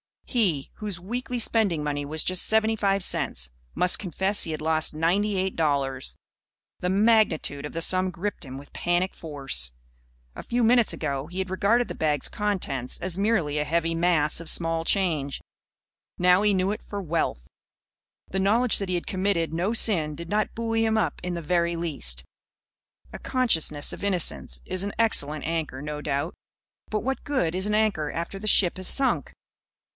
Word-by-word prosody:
He 180 - 0
whose 210 -4 -5
weekly 245 +7 -4
spending 210 -9 +1
money 145 -1 -2
was 155 +2 -2
just 185 -1 +1
seventy 220 0 +3
five 195 -2 +1
cents 60 - -1 0.2
must 180 - +3
confess 190 +2 +1
he 160 - -1
had 155 - -4
lost 160 0 +2
ninety 195 +6 +1
eight 190 0 -1
dollars. 140 -4 0 0.6
The 180 - -1
magnitude 195 -8 +2
of 150 - -7
the 165 - -3
sum 185 +2 +2
gripped 180 0 -4
him 130 0 -8
with 140 +1 -12
panic 175 +2 0
force. 135 - -4 0.6
A - - -7
few 240 0 -1
minutes 235 0 +4
ago 140 -2 -3
he 175 +2 -10
had 190 0 -2
regarded 210 +6 +2
the - - -5
bag's 150 -3 0
contents 180 -12 -2
as 185 -1 0
merely 195 -8 +1
a 150 - 0
heavy 165 +1 0
mass 165 -3 +2
of 165 - -4
small 165 -1 0
change. 160 -9 0 0.8
Now 180 +1 +5
he 210 -1 +3
knew 190 +1 +1
it 210 - -4
for 205 -1 -6
Wealth. 160 - -1 0.9
The 190 - -2
knowledge 220 +5 +3
that 195 -2 -3
he 180 - 0
had 175 - -3
committed 185 -4 0
no 180 +7 0
sin 165 -10 +1
did 170 +2 -8
not 210 +1 0
buoy 225 0 0
him 220 0 +2
up 220 - 0
in 180 - -3
the 170 - -5
very 170 +1 +1
least. 135 - -2 0.9
A - - -7
consciousness 165 - +2
of - - -9
innocence 80 - 0
is 185 - -2
an 200 - -4
excellent 155 -10 +3
anchor, 160 -5 -3
no 150 0 -5
doubt. 145 +3 -2 0.6
But 215 -1 -1
what 265 +1 -2
good 220 - 0
is 190 +2 0
an 210 - +1
anchor 205 -9 +1
after 170 +4 -4
the 215 - -5
ship 185 -4 +4
has 185 - -4
sunk? 270 -1 +1
180 Hz, 180 wpm, -26 LUFS, 155-205 Hz, 0.9 s, Now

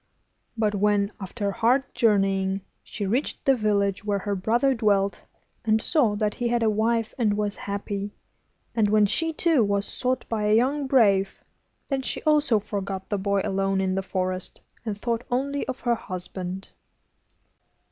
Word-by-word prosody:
But 215 -2 +1
when, 205 0 +2
after 200 +2 -3
hard 235 +5 +2
journeying, 195 -4 +2 0.2
she 205 - -5
reached 240 +9 -1
the 270 - +5
village 205 -3 0
where 205 -1 0
her 200 +1 -2
brother 235 +8 +2
dwelt, 200 -5 +1 0.4
and 220 0 +3
saw 235 -5 +3
that 210 0 0
he 240 - -2
had 235 0 +1
a 220 - +3
wife 225 +1 0
and 210 -3 +2
was 210 -1 -1
happy, 200 0 -4 0.6
and 215 -3 +2
when 210 0 +5
she, 325 +11 +1
too, 320 -5 +3
was 200 0 0
sought 255 +3 -2
by 215 -2 -1
a 210 +1 +4
young 270 +5 +1
brave, 200 -7 +3 0.4
then 275 -2 -1
she - - -4
also 300 -6 +3
forgot 195 -2 -4
the 205 - -1
boy 200 0 +1
alone 195 0 0
in 190 -1 0
the 195 - 0
forest, 185 -1 -3 0.2
and 215 -3 -3
thought 235 +1 -1
only 275 +3 -1
of 260 -1 -5
her 240 - +2
husband. 185 -2 -6
210 Hz, 165 wpm, -25 LUFS, 195-240 Hz, 0.6 s, the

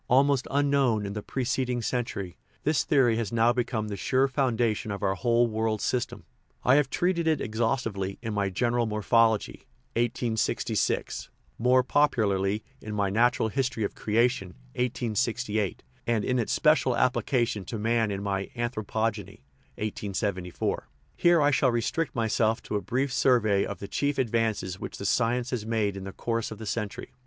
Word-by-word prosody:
Almost 135 +1 +3
unknown 140 -6 +2
in 100 - -4
the 105 - -4
pre 130 +5 -3
ceding 125 -1 -1
century, 105 -7 -3 0.3
this 150 -4 +2
theory 125 -6 +3
has 115 -4 -2
now 115 +1 +3
become 120 -3 -1
the 105 - -4
sure 130 +7 +2
foundation 120 -5 0
of 100 -1 -4
our 95 - +2
whole 120 +4 +2
world 110 -1 -1
system. 125 +3 -2 0.4
I 125 - +5
have 145 -2 +2
treated 175 0 0
it 160 -1 +2
exhaustively 110 -4 -1
in 110 -2 -3
my 100 -1 0
General 120 +4 0
Morphology 110 +1 +1 0.3
(1866), 115 -1 -1 0.3
more 125 +2 +4
popularly 105 -8 +1 0.2
in 105 -1 -6
my 100 -2 0
Natural 115 +1 +2
History 130 -2 -1
of 100 - -2
Creation 110 -4 0 0.2
(1868), 115 -3 -1 0.2
and 115 -3 +1
in 125 -1 +1
its 115 - -1
special 150 -6 +3
application 120 -4 +1
to 115 - -5
man 115 +1 +1
in 100 0 -3
my 100 -1 -2
Anthro 120 -2 -2
pogeny 110 -3 -3 0.4
(1874). 100 -3 -3 0.3
Here 175 -1 +4
I 145 -1 +4
shall 135 -1 +3
restrict 120 +7 -1
myself 110 -1 +1
to - - -4
a 105 - 0
brief 130 +4 -1
survey 110 -6 +3
of 100 - -5
the 100 - -7
chief 145 +6 -1
advances 110 -6 0
which - - -6
the 100 - -6
science 120 +3 +1
has 120 -4 -2
made 110 -3 0
in 95 -1 -6
the 95 - -5
course 115 +2 -2
of 110 - -8
the 110 - -8
century. 105 -1 -4
115 Hz, 165 wpm, -27 LUFS, 105-125 Hz, 0.4 s, I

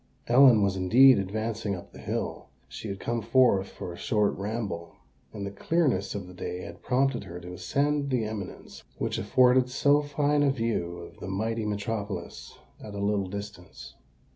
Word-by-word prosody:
Ellen 120 -3 +6
was 100 -1 +1
indeed 120 +7 +6
advancing 110 +1 -2
up 90 - -11
the - - -12
hill. - - -4 0.2
She 110 - -8
had 100 -1 -5
come 120 0 -2
forth 115 -4 +3
for 90 - -7
a - - -10
short 105 +1 +1
ramble; 100 -5 -4 0.4
and 100 -2 -6
the 100 - -5
clearness 135 - 0
of 100 -2 -4
the 90 - -12
day 90 0 -5
had 85 +2 -10
prompted 130 0 +1
her 85 +1 -8
to 90 0 -9
ascend 140 +11 0
the 125 -4 +1
eminence 105 -3 -7 0.2
which - - -2
afforded 125 0 +4
so 145 +3 +3
fine 145 0 +1
a 145 - +4
view 115 -9 -1
of 85 -1 -11
the - - -7
mighty 110 +3 -2
metropolis 105 0 -4 0.3
at 105 -1 -8
a - - -4
little 100 -1 0
distance. 100 -1 -8
105 Hz, 175 wpm, -27 LUFS, 95-125 Hz, 0.4 s, Ellen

